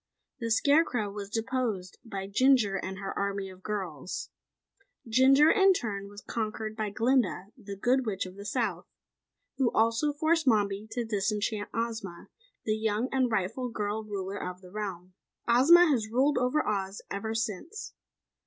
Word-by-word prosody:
The 230 -2 -3
Scarecrow 245 -4 +2
was 200 -1 -6
deposed 225 -5 -2
by 200 -4 -5
Jinjur 215 -2 +3
and 190 0 -5
her 195 0 -5
Army 200 -1 -2
of 185 0 -15
Girls. 185 -7 -5 0.8
Jinjur, 270 +6 +6
in 390 -1 +5
turn 200 - -3
was 205 0 -11
conquered 215 -1 -4
by 215 -1 -2
Glinda, 230 -3 +1
the 200 -6 -8
Good 250 +5 +1
Witch 195 -3 -1
of 185 - -9
the 200 - -9
South, 205 - -2 0.7
who 260 -3 +3
also 230 +6 +2
forced 315 +1 +1
Mombi 205 -2 +2
to 235 +1 -3
disenchant 210 0 -1
Ozma, 225 -6 -4 0.4
the 215 - +1
young 220 +3 -1
and 260 -2 +1
rightful 220 +5 -1
girl 215 -1 -3
ruler 200 -1 -5
of 180 0 -6
the 180 -1 -14
realm. 185 -3 -5 0.3
Ozma 285 +9 +7
has 255 -9 +1
ruled 265 +6 +2
over 250 +5 +1
Oz 195 -1 -2
ever 220 +3 -3
since. 225 - -4
220 Hz, 155 wpm, -29 LUFS, 200-250 Hz, 0.8 s, Ozma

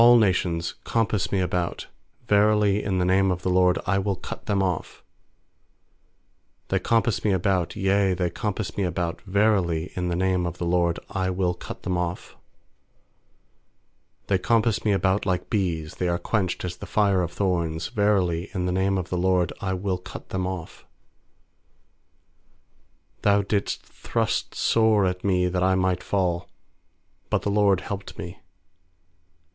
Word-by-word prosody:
10A11 120 0 +8
nations 90 -5 +1
compass 110 -4 0
me 100 - +1
about, 90 -1 -2 0.4
Verily, 105 -1 +3
in 95 -2 -1
the 90 - +1
name 95 +1 +3
of 90 -1 -2
the 90 - +1
LORD 90 -1 +4
I 95 0 +2
will 100 0 -1
cut - - -8
them 100 -2 +2
off. 90 -4 -3 1.7
uThey - - +1
compass 115 -2 +1
me 105 - +2
about, 95 -2 0
yea, 95 -1 +2
they 90 -1 -1
compass 105 +2 -3
me 100 - +1
about; 85 -1 -2
Verily, 95 -5 +1
in 90 -1 -1
the 85 - -1
name 90 -1 +1
of 85 +1 -6
the 85 - -3
LORD 85 -1 +2
I 95 -1 -1
will 90 -1 0
cut - - -9
them 90 -1 -1
off. 90 0 -4 1.9
12They 95 -2 +1
compass 115 -2 +2
me 105 - +2
about 100 +1 +1
like 90 +3 -1
bees;, 85 -8 -1
They 90 - -2
are 85 0 +1
quenched 95 -2 -1
as 90 0 -5
the - - -8
fire 100 -3 +2
of 85 -1 -2
thorns; 85 -4 -1
Verily, 95 -4 +1
in 90 -1 -1
the 90 - 0
name 95 +1 +1
of 90 -1 -4
the 90 - 0
LORD 90 -2 +2
I 95 -1 -1
will 95 -1 -2
cut 95 +1 -10
them 95 -1 -2
off. 95 -3 -6 2.4
13Thou 100 -2 +3
didst 100 -2 -1
thrust - - -2
sore 110 -3 +3
at 90 0 -2
me 90 -2 +2
that 90 0 -1
I 95 +1 +3
might 95 -1 +1
fall; 90 -3 -1 0.8
But - - 0
the 100 - 0
LORD 100 -2 +3
helped 100 0 -6
me. 90 +2 -7
95 Hz, 160 wpm, -25 LUFS, 90-100 Hz, 2.4 s, 10A11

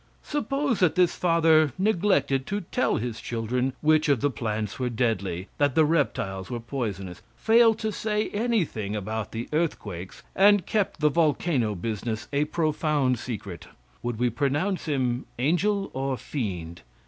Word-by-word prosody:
Suppose 285 -4 -1
that 180 -4 +3
this 180 -2 +3
father 160 -4 +4
neglected 175 -9 +1
to 205 +1 -2
tell 250 +8 0
his 120 0 -4
children 125 +3 -1
which 155 0 +3
of 140 -4 +3
the 145 +4 +1
plants 110 -3 -3
were 125 -1 0
deadly; 100 -6 -1
that 145 -3 +2
the 160 - +5
reptiles 95 - -1
were 120 - -3
poisonous; 105 -8 -5
failed 225 0 +4
to 220 -1 -2
say 210 0 -1
anything 200 - -1
about 110 +1 -4
the 115 +1 -4
earthquakes, 100 - -3
and 205 -1 +5
kept 205 -7 -1
the 150 - +5
volcano 145 -7 +1
business 110 +2 -4
a 145 +1 +2
profound 150 -5 0
secret; 100 -8 -6 0.3
would 120 -2 -3
we 120 +1 +1
pronounce 145 - -1
him 130 -4 -1
angel 190 - +1
or 135 0 -2
fiend? 90 - -5
140 Hz, 150 wpm, -26 LUFS, 115-170 Hz, 0.3 s, the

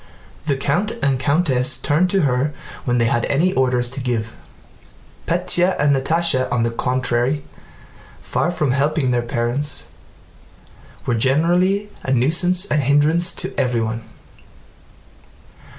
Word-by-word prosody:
The 140 - +2
count 150 +11 0
and 135 -2 +2
countess 140 -3 +1
turned 160 +5 +1
to 195 -1 +2
her 135 +2 0 0.3
when 125 -1 +1
they 115 - +2
had 120 +1 +1
any 170 +7 +1
orders 125 -5 +1
to 135 - -1
give. 115 -3 -2 0.9
Pétya 180 +2 +1
and 145 -1 +3
Natásha 135 -1 +1
on 120 -2 +1
the 115 - 0
contrary, 125 +3 0 0.8
far - - -1
from 155 -6 0
helping 140 0 +1
their 120 -1 +1
parents, 120 +4 -2 1.2
were 120 - 0
generally 175 - +2
a 130 - -2
nuisance 170 +9 +1
and 155 -6 +1
a - - -4
hindrance 155 +5 +3
to - - -5
everyone. 115 -2 -1
140 Hz, 130 wpm, -20 LUFS, 125-165 Hz, 1.2 s, and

